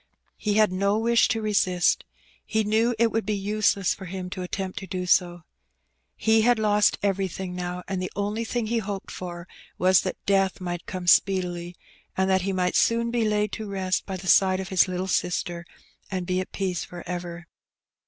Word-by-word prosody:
He 210 Hz, -2 st, -1 dB
had 215 Hz, -2 st, +4 dB
no 200 Hz, +3 st, +1 dB
wish 235 Hz, +1 st, +3 dB
to 225 Hz, -1 st, -1 dB
resist. 185 Hz, -4 st, +2 dB, 0.4 s
He 220 Hz, 0 st, 0 dB
knew 225 Hz, +3 st, +2 dB
it 230 Hz, 0 st, +3 dB
would 225 Hz, -, 0 dB
be 210 Hz, +1 st, -1 dB
useless 200 Hz, -1 st, +1 dB
for 190 Hz, -, -10 dB
him 180 Hz, 0 st, -6 dB
to 185 Hz, -, -5 dB
attempt 185 Hz, +1 st, -4 dB
to 190 Hz, -, -9 dB
do 185 Hz, -1 st, -3 dB
so. 175 Hz, -1 st, +2 dB, 0.7 s
He 220 Hz, +1 st, +3 dB
had 240 Hz, +1 st, +4 dB
lost 210 Hz, -1 st, +3 dB
everything 190 Hz, -2 st, -1 dB
now, 180 Hz, 0 st, -4 dB
and 190 Hz, -2 st, -2 dB
the 185 Hz, -, -4 dB
only 205 Hz, +3 st, -2 dB
thing 235 Hz, 0 st, -2 dB
he 230 Hz, +1 st, 0 dB
hoped 200 Hz, -2 st, -5 dB
for 175 Hz, -1 st, -7 dB, 0.3 s
was 185 Hz, 0 st, +4 dB
that 185 Hz, -, -4 dB
death 195 Hz, -2 st, +2 dB
might 175 Hz, -2 st, -5 dB
come 185 Hz, -2 st, -5 dB
speedily, 175 Hz, -1 st, +2 dB, 0.4 s
and 190 Hz, 0 st, +2 dB
that 190 Hz, 0 st, +3 dB
he 195 Hz, +2 st, -1 dB
might 180 Hz, -1 st, 0 dB
soon 235 Hz, 0 st, +2 dB
be 235 Hz, -2 st, +1 dB
laid 210 Hz, -1 st, 0 dB
to 215 Hz, -2 st, -5 dB
rest 190 Hz, -2 st, -1 dB
by 190 Hz, -1 st, -4 dB
the 185 Hz, -, -10 dB
side 185 Hz, +1 st, +4 dB
of 190 Hz, -1 st, -5 dB
his 190 Hz, -1 st, +4 dB
little 185 Hz, 0 st, -2 dB
sister, 175 Hz, -2 st, -2 dB, 0.4 s
and 185 Hz, -2 st, -3 dB
be 185 Hz, 0 st, 0 dB
at 185 Hz, -, -8 dB
peace 185 Hz, -3 st, -2 dB
for 175 Hz, -1 st, -9 dB
ever. 175 Hz, -1 st, -5 dB
190 Hz, 195 wpm, -25 LUFS, 180-210 Hz, 0.7 s, had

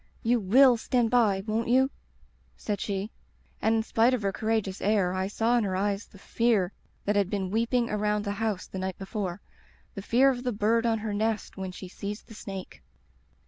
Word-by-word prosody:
"*You 240 Hz, +1 st, +3 dB
will 245 Hz, +5 st, +6 dB
stand 235 Hz, 0 st, +1 dB
by, 210 Hz, -6 st, +3 dB
won't 225 Hz, +1 st, -1 dB
you?' 260 Hz, +3 st, +3 dB, 0.7 s
said 205 Hz, -2 st, -3 dB
she. 200 Hz, +1 st, -3 dB, 0.5 s
And 220 Hz, +1 st, +3 dB
in 220 Hz, -, +1 dB
spite 230 Hz, +3 st, +3 dB
of 225 Hz, -, -5 dB
her 195 Hz, -, +1 dB
courageous 215 Hz, -2 st, -1 dB
air 200 Hz, -3 st, +2 dB
I 185 Hz, 0 st, -1 dB
saw 225 Hz, +4 st, +1 dB
in -, -, 0 dB
her 190 Hz, -2 st, -1 dB
eyes 200 Hz, +2 st, -1 dB
the 200 Hz, -, -17 dB
Fear 205 Hz, -2 st, +1 dB, 0.3 s
that 205 Hz, -, +1 dB
had 200 Hz, -2 st, +2 dB
been 195 Hz, -3 st, -2 dB
weeping 235 Hz, +2 st, +1 dB
around 210 Hz, 0 st, 0 dB
the 200 Hz, -, -1 dB
house 210 Hz, -2 st, -2 dB
the 190 Hz, -, -7 dB
night 190 Hz, -1 st, -3 dB
before, 195 Hz, -2 st, -4 dB, 0.5 s
the 200 Hz, -, -6 dB
fear 255 Hz, +7 st, +4 dB
of 245 Hz, -2 st, -4 dB
the 250 Hz, -, 0 dB
bird 225 Hz, +3 st, +2 dB
on 225 Hz, -1 st, +2 dB
her 215 Hz, -1 st, -4 dB
nest 215 Hz, +1 st, -1 dB
when 190 Hz, -1 st, -5 dB
she 185 Hz, +1 st, -9 dB
sees 200 Hz, +3 st, -6 dB
the 225 Hz, -, -14 dB
snake. 195 Hz, -, -8 dB
210 Hz, 200 wpm, -28 LUFS, 195-230 Hz, 0.7 s, will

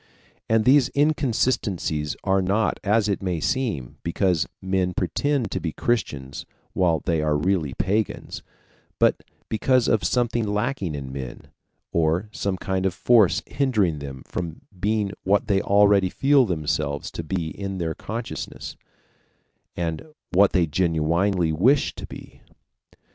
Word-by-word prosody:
And 110 Hz, -1 st, +3 dB
these 135 Hz, 0 st, +5 dB
inconsistencies 120 Hz, -, 0 dB
are 95 Hz, -1 st, +2 dB
not, 100 Hz, +4 st, +1 dB
as 105 Hz, +1 st, +2 dB
it 100 Hz, -, -1 dB
might 90 Hz, -4 st, -2 dB
seem, 110 Hz, -, -2 dB
because 85 Hz, -1 st, +1 dB
men 95 Hz, -1 st, -1 dB
pretend 135 Hz, -, 0 dB
to -, -, -1 dB
be 80 Hz, -3 st, -3 dB
Christians 70 Hz, -, -2 dB, 0.3 s
while 85 Hz, -5 st, +2 dB
they 80 Hz, -3 st, 0 dB
are 75 Hz, -1 st, +1 dB
really 85 Hz, -3 st, 0 dB
pagans, 105 Hz, +2 st, -2 dB, 0.6 s
but -, -, +3 dB, 0.3 s
because 125 Hz, +2 st, +2 dB
of 110 Hz, -2 st, +2 dB
something 120 Hz, -2 st, +1 dB
lacking 105 Hz, -, -1 dB
in 70 Hz, -2 st, -6 dB
men, 65 Hz, -3 st, -7 dB, 0.4 s
or 85 Hz, +5 st, +1 dB
some 100 Hz, -3 st, -2 dB
kind 95 Hz, 0 st, -1 dB
of 90 Hz, -, -3 dB
force 110 Hz, -6 st, +4 dB
hindering 105 Hz, -, 0 dB
them 70 Hz, -2 st, -8 dB
from 85 Hz, -3 st, -5 dB, 0.2 s
being 105 Hz, 0 st, 0 dB
what 100 Hz, +2 st, +2 dB
they 95 Hz, -2 st, +2 dB
already 100 Hz, -1 st, +4 dB
feel 135 Hz, +3 st, +3 dB
themselves 75 Hz, -4 st, -2 dB
to 85 Hz, -, -5 dB
be 85 Hz, 0 st, -2 dB
in 100 Hz, -1 st, -5 dB
their 85 Hz, -2 st, -2 dB
consciousness, 115 Hz, +7 st, -6 dB, 1.0 s
and 80 Hz, -2 st, -2 dB, 0.3 s
what 100 Hz, +2 st, +5 dB
they 90 Hz, -3 st, +3 dB
genuinely 85 Hz, +2 st, +1 dB
wish 125 Hz, -, +3 dB
to -, -, -8 dB
be. -, -, -12 dB
95 Hz, 135 wpm, -24 LUFS, 80-110 Hz, 1.0 s, these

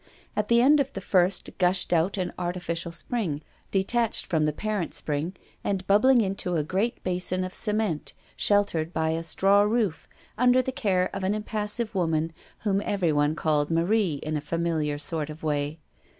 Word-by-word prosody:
At -, -, 0 dB
the 235 Hz, 0 st, +5 dB
end 295 Hz, +3 st, +6 dB
of 275 Hz, -1 st, 0 dB
the -, -, -4 dB
first 185 Hz, 0 st, +1 dB
gushed 180 Hz, 0 st, +2 dB
out 175 Hz, +4 st, +2 dB
an 185 Hz, -2 st, -2 dB
artificial 175 Hz, -1 st, -3 dB
spring 170 Hz, -4 st, -3 dB, 0.3 s
detached 225 Hz, +4 st, +1 dB
from 160 Hz, -4 st, +1 dB
the 150 Hz, -, +2 dB
parent 205 Hz, +2 st, -2 dB
spring, 155 Hz, +5 st, -2 dB, 0.3 s
and 195 Hz, -2 st, -1 dB
bubbling 240 Hz, +5 st, +5 dB
into 190 Hz, -3 st, -1 dB
a 155 Hz, -, +1 dB
great 195 Hz, +9 st, -1 dB
basin 185 Hz, 0 st, 0 dB
of 185 Hz, 0 st, -5 dB
cement, 210 Hz, -7 st, -1 dB, 0.2 s
sheltered 180 Hz, -5 st, +1 dB
by 160 Hz, 0 st, 0 dB
a 165 Hz, +1 st, -1 dB
straw 195 Hz, +5 st, +3 dB
roof, 210 Hz, -5 st, 0 dB, 0.3 s
under 250 Hz, +1 st, +5 dB
the 260 Hz, -, -2 dB
care 185 Hz, -7 st, 0 dB
of 195 Hz, -, -4 dB
an 195 Hz, +2 st, +1 dB
impassive 215 Hz, +1 st, -2 dB
woman, 165 Hz, -3 st, 0 dB, 0.3 s
whom 200 Hz, -2 st, +1 dB
everyone 155 Hz, -6 st, +1 dB
called 150 Hz, -3 st, +1 dB
"Marie" 170 Hz, +1 st, +2 dB
in 155 Hz, 0 st, -2 dB
a 150 Hz, -, -1 dB
familiar 155 Hz, -1 st, -1 dB
sort 150 Hz, +1 st, -2 dB
of 155 Hz, +1 st, -9 dB
way. 145 Hz, 0 st, -1 dB
185 Hz, 170 wpm, -26 LUFS, 160-210 Hz, 0.3 s, end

